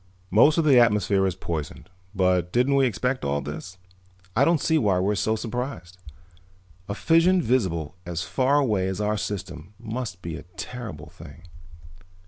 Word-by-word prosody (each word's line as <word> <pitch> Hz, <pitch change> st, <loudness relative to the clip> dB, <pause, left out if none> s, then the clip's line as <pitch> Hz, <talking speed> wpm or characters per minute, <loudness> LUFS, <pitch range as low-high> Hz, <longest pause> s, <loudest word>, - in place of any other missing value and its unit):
"Most 145 Hz, +10 st, +5 dB
of 165 Hz, -, +2 dB
the 135 Hz, -5 st, +6 dB
atmosphere 105 Hz, -4 st, +3 dB
is 90 Hz, -, -2 dB
poisoned. 80 Hz, -4 st, -5 dB, 0.3 s
But 90 Hz, -2 st, +1 dB
didn't 125 Hz, +5 st, +2 dB
we 135 Hz, -1 st, +4 dB
expect 125 Hz, +4 st, -2 dB
all 70 Hz, +1 st, 0 dB
this? 75 Hz, +6 st, -7 dB, 0.6 s
I 125 Hz, -, +4 dB
don't 165 Hz, +2 st, +3 dB
see 160 Hz, +2 st, +2 dB
why 100 Hz, -7 st, +2 dB
we're 95 Hz, +3 st, +1 dB
so 110 Hz, +2 st, 0 dB
surprised. 115 Hz, -6 st, -5 dB, 0.9 s
A 100 Hz, -, -2 dB
fission 165 Hz, -, +3 dB
visible 95 Hz, -, 0 dB
as 85 Hz, -1 st, -4 dB
far 135 Hz, +2 st, +1 dB
away 105 Hz, -10 st, +1 dB
as 95 Hz, +1 st, -3 dB
our 105 Hz, 0 st, 0 dB
system 95 Hz, -3 st, -6 dB
must 110 Hz, -4 st, -6 dB
be 85 Hz, -2 st, -5 dB
a -, -, -10 dB
terrible 110 Hz, -12 st, -7 dB
thing." -, -, -14 dB
105 Hz, 160 wpm, -25 LUFS, 90-125 Hz, 0.9 s, the